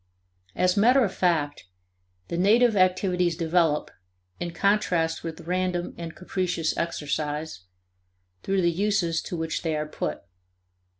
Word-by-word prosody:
As 180 0 +2
matter 245 +6 +5
of 190 - -4
fact, 155 - 0 0.6
the - - -4
native 220 +6 +4
activities 180 -2 +2
develop, 165 -3 +1 0.5
in 175 - -3
contrast 170 -3 +1
with 165 -1 -6
random 180 0 -2
and 165 -1 -7
capricious 180 -3 -2
exercise, 150 - -3 0.8
through 195 -1 0
the 170 - +3
uses 180 -3 0
to 175 - -5
which 160 0 -2
they 160 -2 -1
are 150 0 -2
put. 75 - -4
175 Hz, 125 wpm, -26 LUFS, 160-185 Hz, 0.8 s, matter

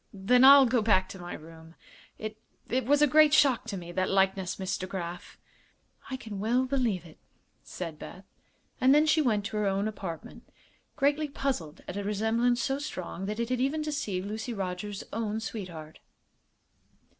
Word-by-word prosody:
"Then 215 +6 +3
I'll 275 0 +9
go 245 -1 +2
back 190 -4 +3
to 190 - -9
my 175 0 -6
room. 160 +1 -13 0.4
It 215 0 -6 0.3
it 255 +1 0
was 290 +1 +4
a - - +6
great 305 +1 +6
shock 270 -5 +4
to 200 - -4
me, 175 -1 -8
that 185 +1 -1
likeness, 190 -1 +1
Miss 190 0 -2
DeGraf." 180 -1 -6 0.7
"I 260 - -3
can 215 -5 -7
well 240 +5 +1
believe 240 - -1
it," 155 - -15 0.4
said 165 -4 -7
Beth; 185 +1 -10 0.6
and 260 +2 +6
then 300 +1 +5
she 315 0 +3
went 215 -7 +1
to 215 +1 -4
her 210 -1 +1
own 195 +2 0
apartment, 190 -6 -7 0.5
greatly 290 +2 +1
puzzled 270 - -3
at 180 - -5
a 205 - -3
resemblance 225 +4 +1
so 270 0 -1
strong 195 - -5
that 210 +2 -4
it 235 0 -1
had 255 -1 0
even 295 +4 0
deceived 205 -11 -3
Lucy 220 +3 -4
Rogers's 195 +1 -5
own 220 -1 -2
sweetheart. 180 -9 -7
210 Hz, 175 wpm, -29 LUFS, 185-260 Hz, 0.7 s, I'll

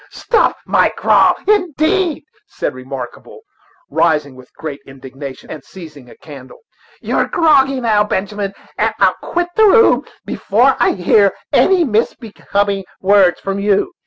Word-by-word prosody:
"Stop 470 - 0
your - - +2
grog, - - +2
indeed!" 360 -3 0 0.2
said - - -4
Remarkable, 130 - -9 0.5
rising 150 -5 0
with 130 0 -16
great 155 -3 -7
indignation, 135 0 -10
and 155 - -8
seizing 155 -9 -13
a - - -15
candle; 140 -4 -13 0.4
"you're - - -1
groggy 275 -5 +2
now, 220 -4 +2
Benjamin 200 0 -4 0.2
and - - 0
I'll - - +4
quit 350 0 -2
the 440 - +5
room 455 +2 +4 0.2
before 245 +6 +1
I 240 - +2
hear 195 +2 +2 0.2
any 370 -3 +3
misbecoming 205 -4 -2 0.2
words 190 -2 +3
from 195 0 -3
you." 205 - 0
200 Hz, 130 wpm, -16 LUFS, -, 0.5 s, the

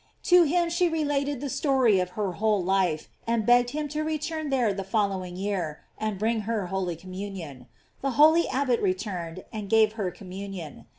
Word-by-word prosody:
To 355 -1 +6
him 340 +2 +1
she 345 +1 +2
related 290 -4 -1
the 285 - -2
story 265 -7 +3
of 180 0 -1
her 205 -3 0
whole 205 +1 +1
life, 180 -4 +1 0.2
and 230 -2 +1
begged 245 +1 +5
him 300 +2 -3
to 300 +2 -2
return 310 0 -3
there 245 -6 +2
the 195 0 -4
following 190 -3 -1
year, 185 -5 -3
and 215 -2 -3
bring 220 +2 0
her 220 -4 0
holy 185 -3 -1
communion. 185 -7 -8 0.3
The 275 - 0
holy 315 +3 +6
abbot 255 -3 +1
returned, 185 -3 -2
and 210 -2 -5
gave 220 0 +4
her 205 -5 -2
communion. 185 -4 -8
215 Hz, 175 wpm, -27 LUFS, 185-275 Hz, 0.3 s, To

